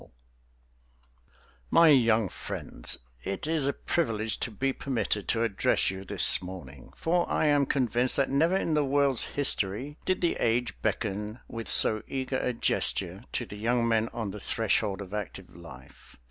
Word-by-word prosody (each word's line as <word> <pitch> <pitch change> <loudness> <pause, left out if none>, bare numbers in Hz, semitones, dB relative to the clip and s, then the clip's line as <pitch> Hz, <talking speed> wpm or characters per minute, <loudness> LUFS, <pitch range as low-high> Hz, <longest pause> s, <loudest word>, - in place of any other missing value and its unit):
_) - - -17 1.6
My 165 - +6
young 115 -6 +4
friends - - -2 0.3
It 95 - -3
is 155 -3 +1
a 140 - +1
privilege 110 -9 -1
to - - -2
be 135 +5 -2
permitted 110 -7 -2
to 115 0 +1
address 100 -4 +1
you 95 0 -7
this 95 - +3
morning, 85 -9 -10
for 175 +1 0
I - - +1
am 145 -2 +3
convinced 125 -1 0
that 140 - +2
never 165 +7 +2
in 165 - -1
the 150 -1 +2
world's 140 -2 +2
history 135 +1 0
did 185 - -1
the 170 - +1
age 120 +1 0
beckon 105 +1 -3
with 115 -1 -7
so 110 -1 +6
eager 130 -1 -3
a 125 - -1
gesture 100 -3 0
to 120 - -2
the 105 - -10
young 115 +2 0
men 115 0 +1
on 110 -4 -4
the 105 - -8
threshold 105 -1 -1
of 95 +1 -12
active 105 -5 -7
life. 70 -7 -14
115 Hz, 165 wpm, -28 LUFS, 105-140 Hz, 1.6 s, My